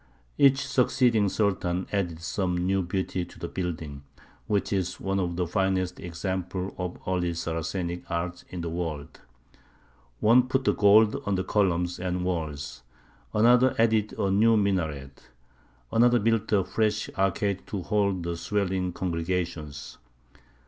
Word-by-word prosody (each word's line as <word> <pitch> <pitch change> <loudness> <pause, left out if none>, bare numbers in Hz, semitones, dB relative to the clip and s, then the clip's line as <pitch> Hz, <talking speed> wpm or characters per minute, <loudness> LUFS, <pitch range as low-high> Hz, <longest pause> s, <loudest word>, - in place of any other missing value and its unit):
Each 140 0 +5
succeeding 125 -5 +2
Sultan 95 -3 0
added 85 -5 -2
some 90 +1 -1
new 95 +2 +1
beauty 90 0 -2
to - - -12
the - - -5
building, 80 -6 -5 0.5
which 100 0 0
is 95 -1 -1
one 95 0 -1
of 85 -2 -1
the 90 0 0
finest 95 0 0
examples 95 +1 -4
of 90 -1 -4
early 90 -2 0
Saracenic 85 +2 -3
art 90 +1 -3
in 90 - -5
the 85 - -3
world. 80 -4 -5 1.0
One 120 +4 +5
put 130 +1 0
the - - +3
gold 105 +1 +5
on 100 - +1
the 95 - -1
columns 90 -4 0
and 90 0 -2
walls; 80 -7 -3 0.5
another 125 +4 +4
added 110 -2 +2
a 95 - +1
new 110 +3 +4
minaret; 80 -10 -2 0.6
another 120 +1 +5
built 115 0 +1
a 100 -3 +4
fresh 110 +2 0
arcade 95 0 0
to 100 -4 -4
hold 100 -3 0
the 85 0 -2
swelling 95 -1 -1
congregations. 85 -4 -3
95 Hz, 140 wpm, -27 LUFS, 85-105 Hz, 1.0 s, Each